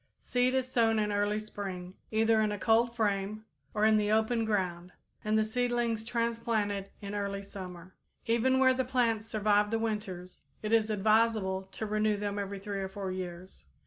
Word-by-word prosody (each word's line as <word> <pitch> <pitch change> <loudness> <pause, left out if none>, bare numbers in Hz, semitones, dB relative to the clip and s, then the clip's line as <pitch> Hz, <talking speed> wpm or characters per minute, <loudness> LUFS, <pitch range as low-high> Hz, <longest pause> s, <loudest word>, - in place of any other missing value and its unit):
Seed 250 +1 +1
is 260 -1 +1
sown 230 -3 +2
in 210 -1 +1
early 205 +1 +1
spring, 195 -4 -6 0.2
either 220 0 +3
in 215 -1 +1
a 205 - -2
cold 230 +3 +3
frame 210 -1 -1 0.3
or 210 0 +1
in 220 0 +5
the 210 0 +1
open 220 +1 +2
ground, 180 -4 -2 0.3
and 215 +1 +2
the 215 - +4
seedlings 240 0 0
transplanted 230 -4 -1
in 200 0 -6
early 200 -1 -3
summer. 185 -2 -9 0.3
Even 235 +3 +2
where 260 0 +5
the 260 0 0
plants 235 -4 +1
survive 210 -1 +2
the 225 - +1
winters, 205 -5 -4 0.2
it 215 +1 -1
is 225 -1 +4
advisable 215 -2 +2
to 220 - -4
renew 215 0 +1
them 205 0 -2
every 200 0 -4
three 200 0 -4
or 190 0 -3
four 195 -1 -4
years. 180 - -7
215 Hz, 175 wpm, -30 LUFS, 200-225 Hz, 0.3 s, in